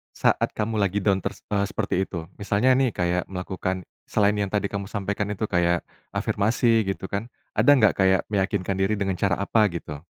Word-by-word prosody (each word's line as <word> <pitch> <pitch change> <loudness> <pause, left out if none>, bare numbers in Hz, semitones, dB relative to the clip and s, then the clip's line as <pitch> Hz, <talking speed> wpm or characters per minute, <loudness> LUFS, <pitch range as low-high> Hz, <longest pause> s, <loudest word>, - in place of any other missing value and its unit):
saat - - +2
kamu 110 0 -1
lagi 100 0 0
down 100 -2 +3
ters - - -6
eee, 100 -1 +2
seperti - - -2
itu? 85 -2 -7
Misalnya 105 +5 +2
nih, 130 -5 +1
kayak 90 0 0
melakukan, 95 0 -3 0.2
selain 105 -1 +2
yang 100 - 0
tadi 100 0 -1
kamu 100 -1 -4
sampaikan 100 0 -2
itu, 105 - -5
kayak 85 -1 +2 0.3
afirmasi 110 0 +2
gitu 95 0 -4
kan, 100 +3 -2 0.2
ada 145 - +5
nggak 110 -6 +4
kayak 95 0 +4
meyakinkan 95 -1 0
diri 95 +3 +2
dengan 95 -3 -2
cara 95 -4 +2
apa 105 +3 +2
gitu? 80 -5 -6
100 Hz, 185 wpm, -25 LUFS, 95-105 Hz, 0.3 s, ada